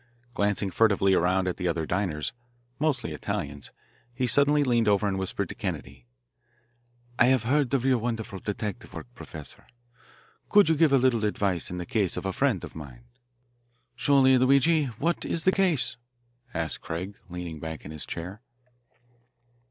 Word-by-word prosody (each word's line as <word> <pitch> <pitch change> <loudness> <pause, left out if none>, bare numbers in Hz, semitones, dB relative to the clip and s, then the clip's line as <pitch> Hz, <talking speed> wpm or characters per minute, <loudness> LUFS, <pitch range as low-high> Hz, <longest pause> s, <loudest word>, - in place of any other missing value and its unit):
Glancing 100 -2 0
furtively 100 -1 +3
around 90 +1 +2
at 90 - -2
the 90 - -2
other 85 -2 -1
diners, 85 -3 -2 0.5
mostly 140 - 0
Italians, 70 -1 -4 0.5
he 125 - 0
suddenly 145 +3 +3
leaned 120 -4 +2
over 105 0 +3
and 95 -1 -1
whispered 95 - -2
to - - -5
Kennedy: 65 -2 -6 1.1
"I - - +7
have 130 -2 +3
heard 135 +1 +1
of 130 -1 0
your 130 -2 +3
wonderful 110 -4 -4
detective 105 +2 -5
work, - - -6
Professor. 80 - -10 0.8
Could 205 -5 +6
you 160 - +4
give 155 -1 +4
a 140 - +6
little 125 -4 +2
advice 100 -4 0
in 90 - -5
the 90 - -4
case 110 -8 0
of - - -4
a 95 - -1
friend 125 - +1
of - - -8
mine?" 65 -6 -10 0.9
"Surely, 130 +1 +4
Luigi. 140 +4 +4
What 135 +8 -2
is 165 - -2
the 185 - +5
case?" 175 -11 +1 0.5
asked 80 -2 -3
Craig, 90 +5 -5 0.2
leaning 85 -3 -6
back 80 0 -7
in 75 - -7
his 80 -1 -6
chair. 90 +6 -6
105 Hz, 160 wpm, -27 LUFS, 90-130 Hz, 1.1 s, I